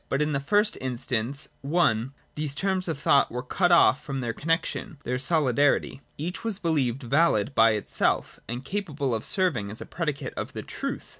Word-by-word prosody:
But 135 - 0
in 150 0 +1
the 140 - +1
first 205 +9 +2
in 130 -2 -3
stance 130 +3 -2
(i) 140 -7 +2 0.3
these 150 -2 -1
terms 190 +2 0
of 165 - -2
thought 140 0 +3
were 125 +1 -4
cut 175 +7 +1
off 150 -4 +5
from 140 -3 -4
their 120 -2 -2
connexion, 165 +1 -2
their 125 +1 -2
solidarity; 140 -2 +2 0.2
each 170 +5 -4
was 225 -4 0
believed 140 -8 0
valid 135 -3 +2
by 115 -2 +5
itself 105 - -1
and 120 +3 -5
capable 150 -10 -2
of 110 -1 -2
serving 150 - 0
as 110 - -7
a - - -7
predicate 150 -5 -3
of - - -5
the - - -5
truth. - - -5
140 Hz, 190 wpm, -26 LUFS, 125-165 Hz, 0.3 s, off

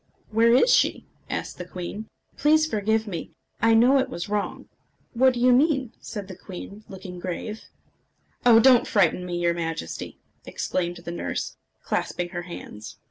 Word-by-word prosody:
"Where 225 +2 +4
is 475 - +5
she?" - - +2 0.2
asked - - -4
the 180 - -6
queen. 185 +4 -6 0.3
"Please 310 +2 +4
forgive 220 -5 0
me. 185 -6 -6 0.3
I 225 0 +5
know 250 +5 +6
it 265 0 0
was 175 -7 -5
wrong." 210 -1 -3 0.5
"What 255 +1 +4
do - - -3
you 250 +1 +5
mean?" 265 -3 +2
said 205 -4 -7
the 190 - -8
queen, 195 +3 -9
looking 190 -2 -8
grave. 190 +4 -5 0.8
"Oh! 235 -2 +7
don't 250 0 +6
frighten 180 -3 +2
me, 175 -1 -3
your 170 0 +2
Majesty!" 165 - -5 0.3
exclaimed 175 -1 -3
the 170 - -4
nurse, 90 - -4 0.3
clasping 175 0 -2
her 175 -1 -4
hands. 105 -10 -9
210 Hz, 160 wpm, -25 LUFS, 175-245 Hz, 0.8 s, Oh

